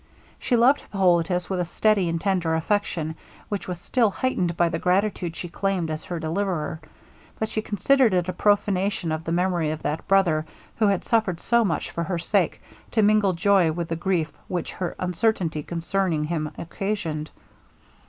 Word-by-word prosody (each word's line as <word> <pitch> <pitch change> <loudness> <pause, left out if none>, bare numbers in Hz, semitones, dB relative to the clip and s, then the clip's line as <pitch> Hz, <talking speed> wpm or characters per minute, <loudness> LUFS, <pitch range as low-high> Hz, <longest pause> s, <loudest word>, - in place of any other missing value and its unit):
She 250 - +1
loved 255 +5 +5
Hippolitus 180 -2 +1
with 190 -2 -2
a 175 - 0
steady 195 +1 +2
and 165 0 -1
tender 180 -4 +1
affection, 160 -2 -1 0.4
which 205 -2 -3
was 180 -2 -4
still 230 +4 +2
heightened 185 -7 -1
by 175 - +4
the 165 - -2
gratitude 180 -2 0
he 175 - -5
claimed 180 -2 -1
as 155 - -5
her 175 -2 -4
deliverer; 165 -1 -2 0.6
but 220 - -2
she 215 - -1
considered 245 +4 +3
it 180 -1 +1
a 185 - -2
prophanation 200 -2 +1
of 155 +1 -3
the 165 - -2
memory 175 -2 +1
of 155 0 -4
that 155 +2 -3
brother 180 -6 +3 0.3
who 220 - +3
had 200 -2 +1
suffered 215 -7 +1
so 235 +4 +3
much 180 -6 -1
for 170 - -2
her 180 0 -2
sake, 175 +1 0 0.3
to 220 - +2
mingle 205 -2 +4
joy 180 -1 +3
with 170 +1 -4
the 165 - -1
grief 170 -2 -1
which 175 -3 -3
her 180 -2 -4
uncertainty 180 -3 0
concerning 170 0 -1
him 155 -1 -2
occasioned. 170 -4 -3
180 Hz, 175 wpm, -24 LUFS, 165-200 Hz, 0.6 s, loved